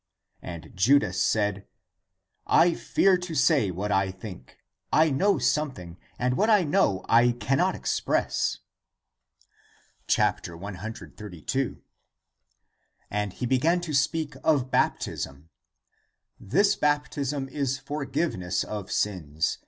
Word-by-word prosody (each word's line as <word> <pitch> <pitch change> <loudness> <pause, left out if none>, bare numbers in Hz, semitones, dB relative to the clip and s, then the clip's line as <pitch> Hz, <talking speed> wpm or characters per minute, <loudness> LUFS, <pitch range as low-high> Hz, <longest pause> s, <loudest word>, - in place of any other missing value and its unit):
And 85 -2 -8
Judas 105 -2 +3
said, 105 -2 0 0.4
" 95 +1 -38 0.2
I 175 0 +3
fear 190 +3 +2
to 175 -2 -6
say 145 - +3
what 95 +4 -3
I 95 -1 +2
think. 95 - -10 0.3
I 155 0 +4
know 195 +9 +2
something, 95 - -2 0.2
and 125 0 0
what 215 +8 +2
I 210 -4 +5
know 145 - +1
I 120 +1 +5
can 120 +3 0
not - - +2
express." - - -1 1.5
132. 100 - -3 1.3
And 105 -2 -2
he - - -4
began 150 +8 +2
to 165 -3 -5
speak 150 +2 0
of 135 -5 +2
baptism: 70 +4 -1 0.5
" - - -46 0.2
This 200 +1 +5
baptism 145 -2 -1
is 135 -1 -1
forgiveness 140 - -2
of 105 -3 -6
sins. 80 -7 -1
125 Hz, 115 wpm, -26 LUFS, 95-150 Hz, 1.5 s, I